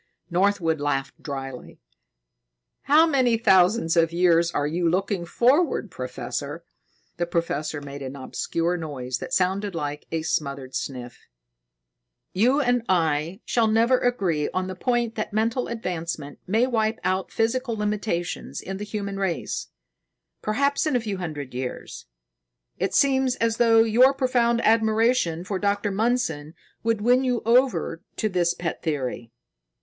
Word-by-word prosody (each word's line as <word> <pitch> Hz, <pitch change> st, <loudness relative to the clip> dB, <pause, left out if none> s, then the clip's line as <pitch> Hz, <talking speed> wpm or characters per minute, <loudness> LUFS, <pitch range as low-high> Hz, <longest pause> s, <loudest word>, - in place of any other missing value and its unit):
Northwood 175 Hz, -4 st, +1 dB
laughed 135 Hz, -2 st, -2 dB
dryly. 135 Hz, -3 st, -7 dB, 1.1 s
"How 305 Hz, +3 st, +6 dB
many 260 Hz, -7 st, +2 dB
thousands 190 Hz, -3 st, +4 dB
of 165 Hz, -1 st, +3 dB
years 170 Hz, -1 st, +3 dB
are 145 Hz, -4 st, -1 dB
you 170 Hz, +3 st, 0 dB
looking 185 Hz, 0 st, -1 dB
forward, 255 Hz, -, +2 dB
Professor?" 135 Hz, +5 st, -5 dB, 0.5 s
The 175 Hz, 0 st, -1 dB
professor 155 Hz, -3 st, -2 dB
made 140 Hz, 0 st, -8 dB
an 135 Hz, 0 st, -6 dB
obscure 165 Hz, +5 st, -2 dB
noise 130 Hz, -6 st, -4 dB
that -, -, -7 dB
sounded 190 Hz, -2 st, 0 dB
like 150 Hz, -2 st, -4 dB
a 160 Hz, -1 st, -2 dB
smothered 140 Hz, -4 st, -2 dB
sniff. 125 Hz, -3 st, -6 dB, 1.1 s
"You 245 Hz, +9 st, +3 dB
and 245 Hz, -3 st, +2 dB
I 165 Hz, +2 st, +1 dB
shall 230 Hz, -2 st, +2 dB
never 230 Hz, +4 st, +3 dB
agree 185 Hz, -12 st, 0 dB
on 185 Hz, 0 st, -2 dB
the 185 Hz, -, -5 dB
point 235 Hz, +4 st, 0 dB
that 215 Hz, -, -3 dB
mental 230 Hz, +4 st, 0 dB
advancement 170 Hz, -9 st, -4 dB
may 220 Hz, +6 st, +3 dB
wipe 225 Hz, -3 st, 0 dB
out 185 Hz, +1 st, -1 dB
physical 230 Hz, +1 st, 0 dB
limitations 210 Hz, -4 st, -2 dB
in 190 Hz, 0 st, -6 dB
the 205 Hz, -, -5 dB
human 200 Hz, -1 st, -4 dB
race, 190 Hz, -4 st, -2 dB, 0.7 s
perhaps 280 Hz, +7 st, +1 dB
in 300 Hz, -, +1 dB
a -, -, +3 dB
few 210 Hz, -4 st, -4 dB
hundred 150 Hz, -7 st, -6 dB
years. 125 Hz, 0 st, -6 dB, 0.7 s
It -, -, -1 dB
seems 265 Hz, -2 st, +3 dB
as 230 Hz, -2 st, 0 dB
though 225 Hz, -1 st, +5 dB
your 250 Hz, +5 st, +5 dB
profound 240 Hz, -3 st, +2 dB
admiration 220 Hz, -5 st, +2 dB
for 195 Hz, 0 st, -3 dB
Dr. 205 Hz, +1 st, 0 dB
Mundson 195 Hz, -8 st, -1 dB, 0.3 s
would 225 Hz, -2 st, 0 dB
win 250 Hz, +4 st, +4 dB
you 250 Hz, -3 st, 0 dB
over 230 Hz, -9 st, +2 dB
to 215 Hz, -, -1 dB
this 175 Hz, -2 st, +1 dB
pet 170 Hz, -1 st, -4 dB
theory." 130 Hz, -7 st, -3 dB
190 Hz, 140 wpm, -24 LUFS, 160-230 Hz, 1.1 s, How